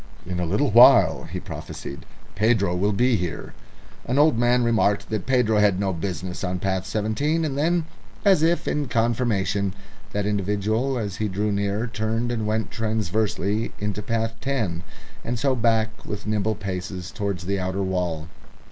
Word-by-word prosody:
"In 90 0 -3
a 90 - -1
little 105 - +1
while," 115 -8 +7
he - - -5
prophesied, 70 - -8 0.3
"Pedro 105 -4 +2
will 100 +4 +1
be 120 +3 +2
here." 85 -3 -4 0.5
An 125 - -1
old 150 -2 +5
man 120 +1 +3
remarked 110 -3 +1
that 110 -1 -2
Pedro 125 -5 +3
had 100 -3 +3
no 100 -1 0
business 90 0 -4
on 90 -1 -1
path 95 0 -2
Seventeen, 110 +11 0
and 140 -3 -2
then, 165 +3 +1 0.4
as 190 -6 +5
if 170 +2 +2
in 145 -2 0
confirmation, 110 -5 0 0.4
that 105 -1 -1
individual 105 +6 0
as 105 -4 -3
he 110 - 0
drew 105 +2 -1
near 100 +2 0
turned 110 +2 -2
and 110 -3 -2
went 110 +1 -1
transversely 110 -1 -1
into 105 0 -3
path 115 +1 -1
Ten, 110 -12 -1 0.4
and 120 - -2
so 135 +2 +1
back 110 -2 +1
with 105 - -6
nimble 110 0 0
paces 95 -2 -5
towards 100 -5 -3
the 100 +1 -1
outer 95 +1 -2
wall. 90 -4 -2
105 Hz, 165 wpm, -24 LUFS, 95-115 Hz, 0.5 s, while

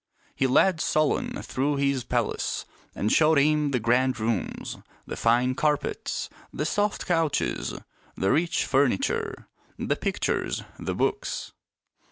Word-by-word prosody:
He 135 - +1
led 160 +6 +4
Solon 155 -1 0
through 145 +3 0
his 140 -2 +1
palace - - -1 0.3
and 105 - 0
showed 155 0 +5
him 150 +1 +3
the 130 -3 +1
grand 125 +2 +2
rooms, 110 -3 -2 0.3
the - - -5
fine 120 +2 +3
carpets, 150 +1 -1 0.2
the 150 - -2
soft 205 +5 0
couches, 165 -4 0 0.4
the 95 - +2
rich 170 +2 +1
furniture, 135 -7 0 0.3
the - - 0
pictures, - - -1 0.2
the - - -3
books. - - -1
140 Hz, 125 wpm, -26 LUFS, 125-155 Hz, 0.4 s, showed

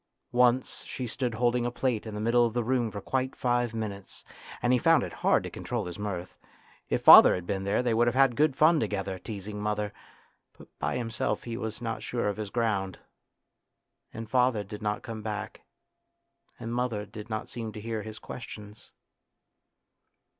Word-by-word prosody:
Once 125 +1 +2
she 130 - -5
stood 120 0 -3
holding 120 +1 +1
a 120 - 0
plate 120 -2 -1
in 105 - -6
the - - -4
middle 115 +3 +3
of 115 -1 0
the 120 - +1
room 120 -1 +1
for 105 - -6
quite 130 +5 -2
five 120 -1 0
minutes, 105 -4 -6 0.4
and 120 +1 +2
he 125 - +4
found 165 +4 +4
it - - -6
hard - - +3
to - - -5
control - - -4
his 90 +2 -7
mirth. 95 -3 -4 0.5
If - - 0
father - - +10
had 90 - -5
been 95 0 -2
there 100 +5 +1
they 120 -2 +1
would 120 +1 +3
have 120 - +1
had 135 -2 +4
good 150 -1 +2
fun 155 +2 +5
together, 95 -6 -2
teasing 105 0 -6
mother, 105 -1 -2 0.6
but - - -15
by - - -1
himself 115 -3 -2
he 115 -1 -5
was 115 0 -5
not 115 -1 -3
sure 120 -3 -2
of 105 - -2
his 105 -2 -4
ground. 100 -5 -1 1.1
And 115 0 -7
father 125 -2 +2
did 105 +2 -9
not 105 0 -2
come 115 -3 -6
back, 105 -1 -5 1.0
and 115 +1 -5
mother 120 -4 -1
did 105 +2 -10
not 110 -1 -3
seem 115 -2 -6
to 105 - -7
hear 110 0 -3
his 110 0 -8
questions. 105 -3 -10
115 Hz, 190 wpm, -28 LUFS, 105-120 Hz, 1.1 s, father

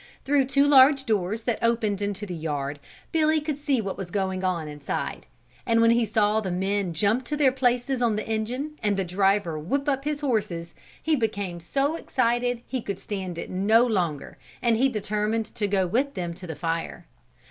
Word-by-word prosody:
Through 280 -1 +3
two 275 +2 +3
large 275 -1 +6
doors 215 0 0
that 240 -2 -1
opened 225 -4 +1
into 205 0 -2
the 185 - -6
yard 145 -3 -3 0.3
Billy 315 -1 +3
could 300 -1 -4
see 285 -3 +1
what 195 -2 -4
was 190 -3 -5
going 190 -1 -2
on 175 -4 -1
inside. 150 -1 -4 0.4
And 230 0 +2
when 230 0 +5
he 235 -1 +2
saw 215 0 +2
the 195 - -3
men 190 +1 -1
jump 210 +9 +2
to 295 - -2
their 280 -3 +4
places 250 0 0
on 230 -3 +2
the 215 - -4
engine 250 +8 -3
and 205 -2 +1
the 195 - +1
driver 185 -2 +1
whip 275 - -2
up 275 -1 +1
his 295 0 -2
horses, 190 - -1 0.3
he 320 -1 +2
became 200 -8 -2
so 275 - 0
excited 245 -3 0
he 260 -2 -3
could 200 -3 -4
stand 190 -4 -5
it - - -6
no 215 +6 +4
longer 175 - -2 0.2
and 235 -2 +2
he 265 +4 +3
determined 215 0 -1
to 210 -3 -1
go 195 -2 +1
with 260 +10 0
them 175 -3 -3
to 180 +1 -10
the 160 - -5
fire. 165 +3 -3
215 Hz, 195 wpm, -25 LUFS, 185-255 Hz, 0.4 s, large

